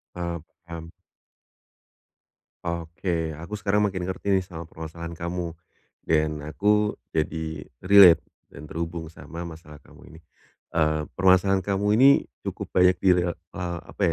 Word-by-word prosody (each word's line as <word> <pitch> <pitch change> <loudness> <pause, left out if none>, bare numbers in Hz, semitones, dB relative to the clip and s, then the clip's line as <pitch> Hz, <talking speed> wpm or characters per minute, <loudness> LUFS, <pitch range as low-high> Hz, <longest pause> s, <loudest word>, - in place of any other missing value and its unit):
Eee, 85 -1 -3 0.3
paham. 85 -1 -8 1.7
Oke. 85 -1 -2
Aku 95 +6 -6
sekarang 105 0 +1
makin 95 -2 -4
ngerti 95 +2 0
nih, 95 - +1
sama 85 -3 -9
permasalahan 85 +1 -8
kamu, 85 -1 -4 0.5
dan 75 -1 +1
aku 105 +8 +1 0.2
jadi 80 -1 -3 0.2
relate 90 -3 +8 0.2
dan 70 - -12
terhubung 85 0 -4
sama 85 +1 -9
masalah 80 -3 -10
kamu - - -17
ini. 80 - -13 0.5
Eee, 80 -1 +1 0.2
permasalahan 95 +1 +4
kamu 100 0 0
ini 135 +2 +8 0.4
cukup - - -5
banyak 90 0 +5
di 95 - +4
rel 90 -1 +2
eee, 85 +1 -6
apa - - -8
85 Hz, 130 wpm, -25 LUFS, 80-95 Hz, 1.7 s, relate